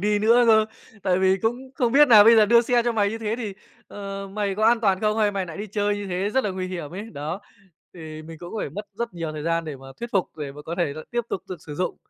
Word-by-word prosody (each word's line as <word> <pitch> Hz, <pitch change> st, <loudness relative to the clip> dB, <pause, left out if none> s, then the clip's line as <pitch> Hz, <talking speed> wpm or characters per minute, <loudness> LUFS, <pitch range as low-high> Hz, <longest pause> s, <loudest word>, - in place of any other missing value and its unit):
đi 210 Hz, +1 st, +2 dB
nữa 230 Hz, +3 st, +5 dB
cơ. 220 Hz, -1 st, +6 dB, 0.4 s
Tại 185 Hz, -1 st, +2 dB
vì 190 Hz, 0 st, +3 dB
cũng 225 Hz, +5 st, 0 dB, 0.2 s
không 245 Hz, -4 st, 0 dB
biết 295 Hz, +1 st, +6 dB
nà 215 Hz, -4 st, +9 dB
"Bây 230 Hz, 0 st, +7 dB
giờ 215 Hz, -, +6 dB
đưa 235 Hz, +2 st, +6 dB
xe 240 Hz, 0 st, +2 dB
cho 240 Hz, -, +1 dB
mày 205 Hz, -2 st, +1 dB
như 225 Hz, -, -4 dB
thế 220 Hz, 0 st, -2 dB
thì, 210 Hz, -5 st, -5 dB, 0.3 s
ờ, 195 Hz, -1 st, -7 dB
mày 200 Hz, -1 st, -1 dB
có 215 Hz, -, 0 dB
an 235 Hz, 0 st, +4 dB
toàn 195 Hz, -3 st, +2 dB
không, 215 Hz, 0 st, +1 dB
hay 210 Hz, -1 st, +3 dB
mày 195 Hz, -2 st, -2 dB
nại 165 Hz, -, -8 dB
đi 210 Hz, +2 st, -5 dB
chơi 205 Hz, 0 st, -1 dB
như 205 Hz, -1 st, -5 dB
thế, 190 Hz, +3 st, -2 dB
rất 265 Hz, +2 st, +1 dB
là 205 Hz, -, 0 dB
nguy 185 Hz, 0 st, -4 dB
hiểm 170 Hz, -6 st, -5 dB
ấy." 205 Hz, +5 st, -7 dB
Đó! 155 Hz, +6 st, -5 dB, 0.5 s
Thì 155 Hz, -2 st, -9 dB
mình 160 Hz, 0 st, -10 dB
cũng 175 Hz, +5 st, -9 dB
phải 145 Hz, -, -3 dB
mất 205 Hz, +7 st, -7 dB
rất 235 Hz, -5 st, -3 dB
nhiều 165 Hz, -2 st, -4 dB
thời 150 Hz, -1 st, -6 dB
gian 165 Hz, 0 st, 0 dB
để 155 Hz, -3 st, -6 dB
mà 135 Hz, 0 st, -14 dB
thuyết 235 Hz, 0 st, -5 dB
phục, 195 Hz, -4 st, -1 dB
để 145 Hz, -2 st, -5 dB
mà 150 Hz, +1 st, -11 dB
có 170 Hz, -, -5 dB
thể 155 Hz, -5 st, 0 dB
lại 155 Hz, -, -8 dB
tiếp 240 Hz, -, 0 dB
tục -, -, -3 dB
được 180 Hz, -4 st, -7 dB
sử 150 Hz, -, -6 dB
dụng. 180 Hz, +2 st, -2 dB
200 Hz, 300 wpm, -24 LUFS, 175-220 Hz, 0.5 s, nà